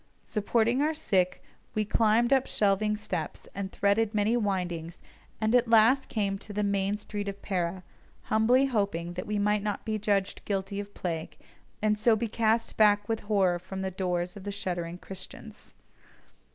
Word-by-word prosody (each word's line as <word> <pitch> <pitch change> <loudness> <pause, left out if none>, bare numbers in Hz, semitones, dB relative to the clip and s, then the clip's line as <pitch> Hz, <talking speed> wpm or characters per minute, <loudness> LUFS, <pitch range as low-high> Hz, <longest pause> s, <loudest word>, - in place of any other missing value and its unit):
Supporting 230 +4 +1
our 310 +2 +1
sick, 190 - 0 0.3
we 215 0 +1
climbed 225 +3 +3
up 265 -1 +3
shelving 210 +1 +1
steps 165 -7 -5
and 195 0 -4
threaded 205 +2 +1
many 210 +3 +2
windings, 180 -6 -2 0.4
and 220 0 +1
at 245 -1 +4
last 230 +4 +5
came 205 -3 0
up 195 - -6
into 210 - -8
the 210 +1 0
main 200 0 0
street 205 -1 -5
of 200 0 -7
Pera, 180 -1 -2 0.4
humbly 240 +5 +3
hoping 200 -9 -1
that 180 +1 -5
we 210 0 -1
might 210 0 +2
not 210 0 -3
be 215 -1 -1
judged 200 -1 0
guilty 195 0 -2
of 205 0 -7
plague, 165 -3 -4 0.5
and 210 -1 +2
so 225 +1 +4
be 230 +2 -1
cast 225 +1 0
back 205 -1 +4
with 225 -1 -1
horror 195 -4 +1
from 190 +1 -6
the 190 - -2
doors 180 -1 -2
of 200 - -9
the 205 - -4
shuddering 175 -3 -3
Christians. 195 +4 -10
205 Hz, 175 wpm, -28 LUFS, 190-220 Hz, 0.5 s, last